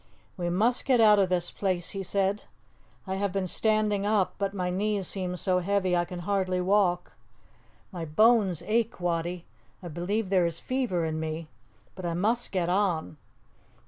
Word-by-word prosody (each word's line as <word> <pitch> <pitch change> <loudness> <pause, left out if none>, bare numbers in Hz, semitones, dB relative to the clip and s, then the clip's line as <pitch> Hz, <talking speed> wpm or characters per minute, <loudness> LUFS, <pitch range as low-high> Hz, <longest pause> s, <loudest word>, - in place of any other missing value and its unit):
"We 175 -2 -2
must 220 +8 +1
get 255 -3 +3
out 210 -2 +6
of 190 -2 +3
this 175 -1 0
place," 185 -3 -1
he 195 - -4
said. 195 +2 -1 0.6
"I 190 -1 -3
have 200 -1 -1
been 195 0 -1
standing 215 +1 +1
up, 205 -2 +1
but 200 -1 0
my 180 -2 -2
knees 200 +1 -1
seem 180 -2 -3
so 180 0 +1
heavy 185 0 +1
I 175 0 +1
can 175 0 -7
hardly 185 0 0
walk. 180 -1 +1 0.8
My 175 -4 -5
bones 195 0 +3
ache, 225 -1 0
Wattie; 175 0 -2 0.4
I 175 - -6
believe 185 +5 -2
there 180 -3 +4
is 170 0 -3
fever 245 -10 -1
in 160 0 -2
me, 160 0 -4 0.4
but 185 - -9
I 170 -1 -2
must 225 +7 0
get 180 -3 0
on. 175 - 0
185 Hz, 175 wpm, -28 LUFS, 175-205 Hz, 0.8 s, out